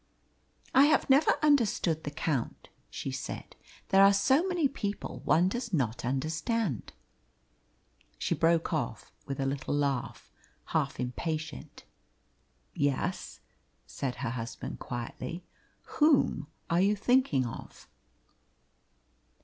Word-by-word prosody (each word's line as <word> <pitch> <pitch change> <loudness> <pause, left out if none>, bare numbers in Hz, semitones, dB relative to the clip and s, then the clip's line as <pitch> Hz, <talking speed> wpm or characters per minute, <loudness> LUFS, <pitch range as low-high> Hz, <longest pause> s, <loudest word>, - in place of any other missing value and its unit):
"I 270 +2 +7
have 300 -2 +3
never 280 +4 +5
understood 220 - +2
the - - -1
Count," 145 -4 -3 0.2
she - - -5
said. - - -6 0.3
"There 195 0 +6
are 200 0 +7
so 265 +9 +4
many 350 -6 +2
people 205 -6 -5
one 175 +3 +4
does 235 +3 -3
not 120 -6 0
understand." 155 - -2 1.2
She - - -1
broke 165 0 +2
off 120 -8 -3 0.2
with 135 -1 -4
a 135 - 0
little 135 +1 -2
laugh, 140 -4 -2 0.4
half 140 -4 0
impatient. 155 +5 -4 0.9
"Yes," 145 +6 -2 0.4
said 130 -3 -4
her 115 - -3
husband 115 -2 -6
quietly. 125 +7 -6 0.6
"Whom 295 - +3 0.2
are 170 +1 +2
you 200 +2 +3
thinking 210 - +2
of?" 115 - -9
160 Hz, 110 wpm, -30 LUFS, 135-210 Hz, 1.2 s, I